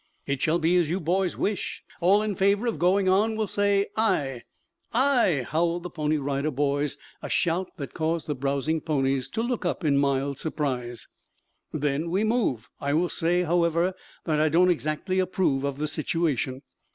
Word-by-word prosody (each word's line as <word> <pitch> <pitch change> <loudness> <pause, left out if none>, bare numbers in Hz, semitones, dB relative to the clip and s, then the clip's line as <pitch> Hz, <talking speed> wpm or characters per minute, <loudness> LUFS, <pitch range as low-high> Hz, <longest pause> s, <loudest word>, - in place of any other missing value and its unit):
"It 140 -1 -2
shall 165 +1 +2
be 170 +1 +2
as 170 -4 +2
you 180 +4 0
boys 180 +3 0
wish. 205 -1 -2 0.2
All 195 +4 +4
in 215 -1 -1
favor 200 +4 +2
of 230 -10 -1
going 185 +3 +3
on 210 +4 +3
will 215 0 0
say 200 0 +2
'aye.'" 145 - 0 0.5
"Aye!" 235 - +3
howled 170 +2 0
the 180 - -6
Pony 155 -1 0
Rider 140 +1 -1
Boys, 145 0 -1 0.2
a - - -6
shout 175 +2 0
that 140 -4 -6
caused 160 0 -1
the 150 - -2
browsing 140 +3 -1
ponies 135 -4 0
to 225 - -2
look 240 -2 -2
up 175 - -2
in 140 -2 +3
mild 140 0 0
surprise. 130 -6 -3 0.6
"Then 150 +2 -1
we 190 +5 +1
move. 215 - 0
I 140 +1 0
will 175 +2 +2
say, 175 +2 +1
however, 170 +1 +2 0.3
that 155 -2 0
I 155 - +3
don't 180 +4 +4
exactly 165 +3 -1
approve 185 -7 +1
of 140 -1 -2
the 150 +1 -1
situation." 150 -4 -1
165 Hz, 175 wpm, -26 LUFS, 140-185 Hz, 0.6 s, All